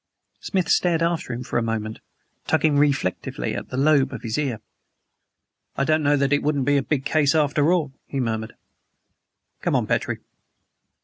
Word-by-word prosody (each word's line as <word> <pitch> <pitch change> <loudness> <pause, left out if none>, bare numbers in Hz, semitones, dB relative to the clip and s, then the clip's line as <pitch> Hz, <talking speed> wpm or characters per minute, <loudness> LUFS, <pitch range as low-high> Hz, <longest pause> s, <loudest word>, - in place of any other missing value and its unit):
Smith 185 -3 -1
stared 170 -2 +2
after 170 -5 -1
him 120 +1 -4
for 125 -1 -1
a - - -1
moment, 110 -1 -3 0.5
tugging 155 -2 +2
reflectively 135 - 0
at - - -6
the 130 - -5
lobe 140 -1 +3
of 120 -3 -7
his 110 -1 -2
ear. 135 -7 -1 1.2
"I 140 - +2
don't 155 +2 +2
know 145 0 +3
that 140 0 +1
it 145 - +2
wouldn't 145 -3 0
be 145 0 +3
a - - +2
big 135 0 -2
case, 145 -1 +2
after 150 +1 +3
all," 155 -7 0
he 140 - -3
murmured. 110 -3 -2 1.1
"Come - - 0
on, - - +2
Petrie." - - -1
140 Hz, 175 wpm, -23 LUFS, 125-150 Hz, 1.2 s, lobe